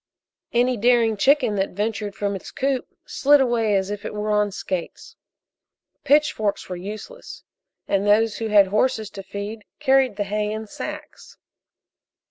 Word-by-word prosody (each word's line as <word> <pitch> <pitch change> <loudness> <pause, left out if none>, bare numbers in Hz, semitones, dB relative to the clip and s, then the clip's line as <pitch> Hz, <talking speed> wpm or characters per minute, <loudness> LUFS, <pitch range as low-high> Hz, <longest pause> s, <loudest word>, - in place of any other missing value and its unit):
Any 245 +1 +2
daring 230 0 +3
chicken 250 -1 +3
that 195 0 -1
ventured 210 -1 -2
from 200 0 -2
its 190 - -8
coop 270 -1 -1 0.2
slid 290 +1 +4
away 235 -5 +2
as 190 +1 0
if 205 0 -5
it 210 - -6
were 210 0 -2
on 210 0 +2
skates. 185 -2 -5 0.9
Pitchforks 285 -8 +1
were 180 - -5
useless, 215 - -9 0.4
and 200 +1 0
those 215 +1 +3
who 225 - -3
had 205 -3 +5
horses 220 0 0
to 195 - -8
feed 200 +3 -7 0.2
carried 265 -5 +3
the 205 - -1
hay 210 +1 -2
in 220 +1 -4
sacks. 210 - -9
215 Hz, 150 wpm, -23 LUFS, 205-245 Hz, 0.9 s, had